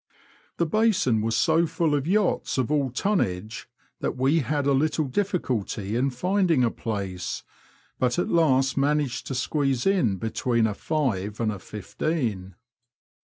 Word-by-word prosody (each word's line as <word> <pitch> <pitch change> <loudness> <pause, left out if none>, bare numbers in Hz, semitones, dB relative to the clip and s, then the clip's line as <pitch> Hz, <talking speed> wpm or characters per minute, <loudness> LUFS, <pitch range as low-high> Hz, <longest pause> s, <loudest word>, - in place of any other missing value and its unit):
The 170 - +2
basin 185 - +2
was 110 0 0
so 165 +1 +3
full 160 -1 0
of 145 0 0
yachts 200 -4 +1
of 130 +1 0
all 145 -3 +1
tonnage 110 - -2 0.3
that - - -2
we 135 +6 +3
had 145 0 -1
a 140 - +3
little 150 +3 +1
difficulty 125 - -2
in 130 +3 +2
finding 175 +1 +1
a 115 - +2
place, 100 -5 -4 0.6
but 125 +2 +1
at 175 - +1
last 135 -5 +2
managed 140 -2 0
to 135 - -3
squeeze 135 -1 0
in 135 - +2
between 115 +3 0
a 110 - 0
five'* 105 - -2
and 115 -2 +1
a 100 - -6
fifteen." 105 - -3
135 Hz, 150 wpm, -25 LUFS, 110-160 Hz, 0.6 s, so